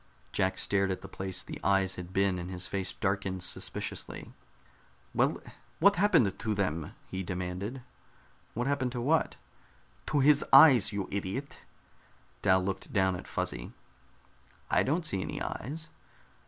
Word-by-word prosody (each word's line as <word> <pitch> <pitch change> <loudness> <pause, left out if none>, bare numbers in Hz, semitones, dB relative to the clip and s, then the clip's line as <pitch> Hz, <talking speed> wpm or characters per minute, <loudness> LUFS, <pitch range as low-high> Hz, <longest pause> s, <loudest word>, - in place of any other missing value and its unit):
Jack 95 0 0
stared 100 -1 +1
at 95 - -3
the - - -8
place 95 -1 -3
the - - -8
eyes 95 -1 +2
had 90 0 -8
been, 95 -1 +1
and 90 +1 -6
his 90 -1 -4
face 95 -2 -3
darkened 95 -2 -2
suspiciously. - - -3 0.8
"Well, - - +2 0.4
what 200 +3 +5
happened 165 - +3
to 110 -2 -1
them?" 85 -6 -2
he 95 - -5
demanded. 90 +7 -4 0.7
"What 120 +2 -1
happened 135 -3 0
to 125 - -3
what?" 155 +6 +1 0.7
"To 145 - +1
his 145 +1 +5
eyes, 125 -10 +8
you 100 -2 -3
idiot!" 100 +8 -4 0.8
Dal 95 -1 +4
looked 95 0 -4
down 95 -2 +2
at 90 - -8
Fuzzy. - - -3 1.0
"I - - +4
don't 160 +5 0
see 95 -10 +1
any - - -4
eyes." 155 +7 -5
100 Hz, 145 wpm, -30 LUFS, 95-130 Hz, 1.0 s, eyes